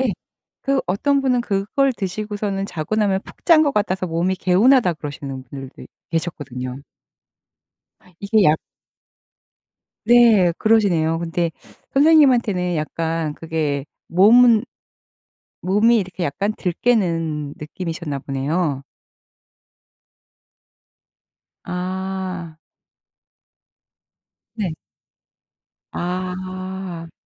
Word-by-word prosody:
예. 260 - +1 0.5
그 275 -1 +1
어떤 275 +10 +1
분은 250 -2 +2
그걸 210 +6 0
드시고서는 205 0 -3
"자고 170 +2 -4
나면 200 -3 +1
푹 - - -16
잔 330 -3 +7
것 285 -2 0
같아서 190 -3 0
몸이 170 +3 0
개운하다." 190 +2 +4
그러시는 140 -3 -7
분들도 135 +1 -10 0.3
계셨거든요. 140 -6 -4 1.4
이게 205 +2 +2
약 155 -1 +4 1.5
네 230 -7 +6
그러시네요. 175 -8 +2
근데 170 0 -1 0.4
선생님한테는 255 - +4
약간 160 0 -2
그게 155 -4 -2 0.2
몸은 225 +5 +6 1.0
몸이 210 +6 +3
이렇게 185 -2 -4
약간 200 +8 -1
덜 180 - -2
깨는 165 -10 0
느낌이셨나 160 -2 -5
보네요. 140 +2 -2 2.8
아. 185 -2 -4 2.0
네. 205 -7 -2 1.2
아. 185 -1 -5
185 Hz, 185 characters per minute, -21 LUFS, 165-210 Hz, 2.8 s, 잔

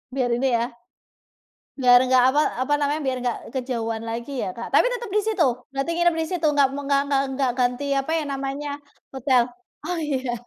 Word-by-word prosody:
Biar 255 -2 +1
ini 250 +3 +1
ya. 230 - 0 1.2
Biar 245 -1 +7
nggak 255 -1 +5
apa 295 - +3 0.2
apa 260 - -1
namanya, 290 +2 0
biar 260 -1 0
nggak 245 - -1 0.2
kejauhan 230 -4 -3
lagi 235 +3 -5
ya, - - -3
Kak. 235 - -6
Tapi - - +5
tetep 475 -3 -5
di - - +5
situ? 430 -6 +2 0.3
Berarti 275 +4 -2
nginep 345 0 +2
di 320 - -1
situ, 350 -4 0
enggak 285 -2 +4
me 285 - -4
enggak 275 0 +2
enggak 280 -1 +1
enggak 265 -1 0
ganti 250 +2 +1 0.2
apa 270 - -6
yang 305 -3 -2
namanya, 275 +2 -4 0.4
hotel. 260 -1 +3 0.4
Oh 360 -1 -2
iya, 265 -5 -2
270 Hz, 195 wpm, -23 LUFS, 250-295 Hz, 1.2 s, Biar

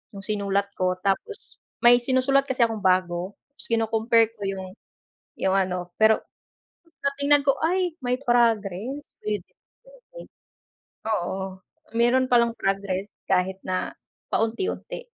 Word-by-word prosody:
yung - - -7
sinulat 200 -1 0
ko 185 0 0
tapos 200 - -3 0.3
may 240 0 +8
sinusulat 265 +2 +3
kasi 260 -2 -1
akong 220 -3 -5
bago 185 0 +1 0.2
tapos 280 - -10
kino-compare 225 0 +3
ko 210 - -9
yung 190 -1 -4 0.7
yung 190 - 0
ano 180 -2 -1
pero 220 0 +5 0.9
ng 280 0 +1
tignan 285 0 +4
ko 275 - +3
ay 360 +1 +1
may 250 0 0
progress 235 0 +1 0.2
with 210 -3 -1
improvement, - - -17 0.8
oo, 190 -3 -1 0.6
meron 250 +2 +4
pa 245 - +6
lang 235 -1 0
progress 195 0 -1 0.2
kahit 190 0 +1
na 185 0 -1 0.4
paunti-unti, 235 - -2
220 Hz, 125 wpm, -25 LUFS, 190-260 Hz, 0.9 s, may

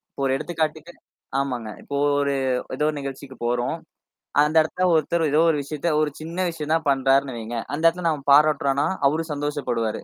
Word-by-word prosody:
இப்ப, - - -11
ஒரு 130 - +1
எடுத்துக்காட்டுக்கு 160 +1 -3 0.5
ஆமாங்க. 125 -5 -3
இப்போ, 140 - -5 0.2
ஒரு 140 0 0 0.4
ஏதோ 150 +2 +1
நிகழ்ச்சிக்கு 135 -1 -7
போறோம். 120 +5 0 0.7
அந்த 150 +2 -1
இடத்தல 180 +3 -1
ஒருத்தர் 160 0 +1
ஏதோ 150 +2 +4
ஒரு 155 - +2
விஷயத்த, 150 +4 -3
ஒரு 150 - 0
சின்ன 170 +4 -3
விஷயம் 155 -1 -3
தான் 160 -2 -2
பண்றாருன்னு 135 -1 +2
வைங்க. 115 +1 -5 0.2
அந்த 160 - -5
இடத்தல 170 +1 +1
நாம 150 -3 -2
பாராட்டுறம்னா, 145 -1 +3 0.2
அவரும் 160 +2 -1
சந்தோஷப்படுவாரு 145 -7 -2
145 Hz, 160 wpm, -23 LUFS, 135-160 Hz, 0.7 s, ஏதோ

